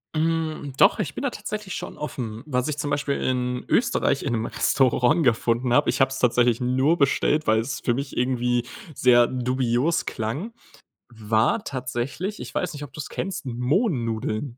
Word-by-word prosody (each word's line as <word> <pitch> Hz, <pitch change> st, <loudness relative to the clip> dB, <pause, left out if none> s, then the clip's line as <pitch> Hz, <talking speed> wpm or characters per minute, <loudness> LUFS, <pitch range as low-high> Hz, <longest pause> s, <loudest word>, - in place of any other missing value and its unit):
Hm, 155 Hz, -3 st, -1 dB
doch, 195 Hz, +3 st, +5 dB
ich 155 Hz, -10 st, -3 dB
bin -, -, -4 dB
da 280 Hz, -, 0 dB
tatsächlich 210 Hz, -5 st, -6 dB
schon -, -, -6 dB
offen. 115 Hz, -5 st, -5 dB
Was 125 Hz, -2 st, -1 dB
ich 150 Hz, -, -3 dB
zum 145 Hz, -1 st, -2 dB
Beispiel 145 Hz, -1 st, 0 dB
in 125 Hz, -1 st, -1 dB
Österreich 230 Hz, -, +2 dB
in 125 Hz, -, -1 dB
'nem 115 Hz, 0 st, -1 dB
Restaurant 135 Hz, +7 st, +2 dB
gefunden 120 Hz, 0 st, +1 dB
habe, 145 Hz, -, +4 dB
ich -, -, 0 dB
hab's 135 Hz, 0 st, +2 dB
tatsächlich 120 Hz, -1 st, +3 dB
nur 130 Hz, +6 st, +2 dB
bestellt, 150 Hz, +1 st, +2 dB
weil 110 Hz, 0 st, +4 dB
es 130 Hz, +4 st, -3 dB
für 120 Hz, -, 0 dB
mich 135 Hz, +2 st, -5 dB
irgendwie 125 Hz, -1 st, +1 dB, 0.3 s
sehr 120 Hz, -2 st, +5 dB
dubios 130 Hz, +4 st, 0 dB
klang, 140 Hz, -, -4 dB, 0.6 s
war 110 Hz, -, +1 dB
tatsächlich, 130 Hz, -, -4 dB
ich -, -, -8 dB
weiß 180 Hz, -, -1 dB
nicht, 145 Hz, 0 st, -7 dB
ob 140 Hz, -, -9 dB
du's 150 Hz, -1 st, -6 dB
kennst, 185 Hz, -4 st, -4 dB
Mohnnudeln. 125 Hz, -, -1 dB
130 Hz, 170 wpm, -24 LUFS, 120-155 Hz, 0.6 s, doch